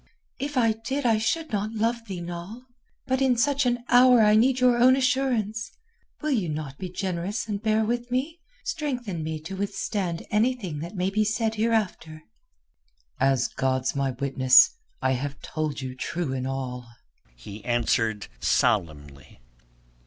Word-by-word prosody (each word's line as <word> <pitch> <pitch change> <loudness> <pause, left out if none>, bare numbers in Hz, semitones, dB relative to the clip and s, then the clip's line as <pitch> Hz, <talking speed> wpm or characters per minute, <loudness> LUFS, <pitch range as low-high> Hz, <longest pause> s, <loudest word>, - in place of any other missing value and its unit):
"If 285 +1 -3
I 230 -3 +4
did 250 +5 -4
I 225 -2 +3
should 315 +8 -1
not 210 +1 -2
love 230 +1 -1
thee, 185 -3 -5
Noll. 175 +7 -7 0.4
But 260 0 0
in 260 -2 +3
such 280 +2 +2
an 245 0 0
hour 250 -1 +6
I 210 0 +5
need 255 +4 +3
your 250 -1 +4
own 255 +2 +6
assurance. 250 -5 0 0.5
Will 305 - 0
you 210 - 0
not 150 -3 -5
be 185 - -5
generous 185 +4 -3
and 205 -2 -3
bear 220 0 +2
with 240 +2 -2
me, 280 +7 -2 0.2
strengthen 250 - -3
me 160 0 -4
to 180 +5 -7
withstand 195 -3 -3
anything 210 - 0
that 170 +6 -7
may 185 +1 0
be 215 +2 +2
said 215 +1 0
hereafter?" 210 -8 -1 1.0
"As 135 -1 +2
God's 130 0 -1
my 140 -1 0
witness, 130 - +5 0.3
I - - +3
have 140 +2 -3
told 155 -3 -3
you 130 -1 -5
true 160 +2 -3
in 130 0 -3
all," 125 -2 -4 0.5
he 100 - -10
answered 115 -2 0
solemnly. 75 -6 -1
205 Hz, 155 wpm, -26 LUFS, -, 1.0 s, hour